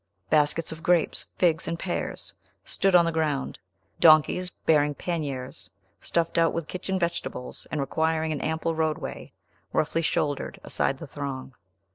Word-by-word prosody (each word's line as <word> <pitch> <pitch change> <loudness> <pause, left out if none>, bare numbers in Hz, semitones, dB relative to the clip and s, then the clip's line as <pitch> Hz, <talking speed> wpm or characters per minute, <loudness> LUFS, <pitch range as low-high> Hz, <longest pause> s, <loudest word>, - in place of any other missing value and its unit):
Baskets 155 +2 +3
of 160 0 -8
grapes, 175 -1 +2
figs, 165 -3 +2
and 170 - -2
pears 175 0 -4 0.3
stood 195 -2 +2
on 170 -1 +7
the 165 - +1
ground. 155 -4 -1 0.4
Donkeys, 160 +3 +5
bearing 150 -4 +2
panniers 140 -8 -4 0.3
stuffed 170 0 0
out 165 -1 +3
with 165 -2 -3
kitchen 190 +1 -3
vegetables, 170 -7 -4
and 150 - -2
requiring 160 +3 0
an 150 - -2
ample 160 +1 -1
roadway, 160 -1 -2 0.4
roughly 165 +2 +1
shouldered 145 -3 -1
aside 135 - 0
the 165 - -8
throng. 135 -2 -6
160 Hz, 140 wpm, -26 LUFS, 145-170 Hz, 0.4 s, on